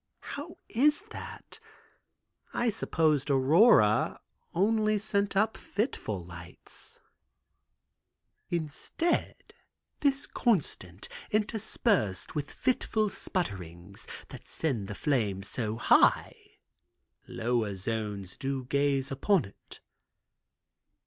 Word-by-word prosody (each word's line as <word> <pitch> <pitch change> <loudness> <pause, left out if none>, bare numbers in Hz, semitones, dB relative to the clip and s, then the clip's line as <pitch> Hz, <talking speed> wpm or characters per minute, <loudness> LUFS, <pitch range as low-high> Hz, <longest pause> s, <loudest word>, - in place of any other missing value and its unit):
"How - - -7
is 295 +5 +3
that? - - -9 1.0
I 240 -1 +2
supposed 155 -7 +1
Aurora 135 - +5 0.3
only 215 +3 +2
sent 200 -1 0
up 215 +2 +3
fitful 110 - -3
lights." 85 0 -10 1.5
"Instead, 170 - -1 0.6
this 280 -1 +2
constant, 120 - -1 0.2
interspersed 210 - 0
with 145 -2 -3
fitful 220 -4 0
sputterings, 95 - -4 0.2
that - - -11
send 125 -11 -2
the 105 - -6
flame 105 -10 0
so 110 +1 -3
high, 110 - +3 0.7
lower 115 -3 -1
zones 100 -2 -4
do 135 -1 -2
gaze 140 0 +1
upon 175 +7 +2
it." 100 - -15
140 Hz, 85 wpm, -29 LUFS, -, 1.5 s, Aurora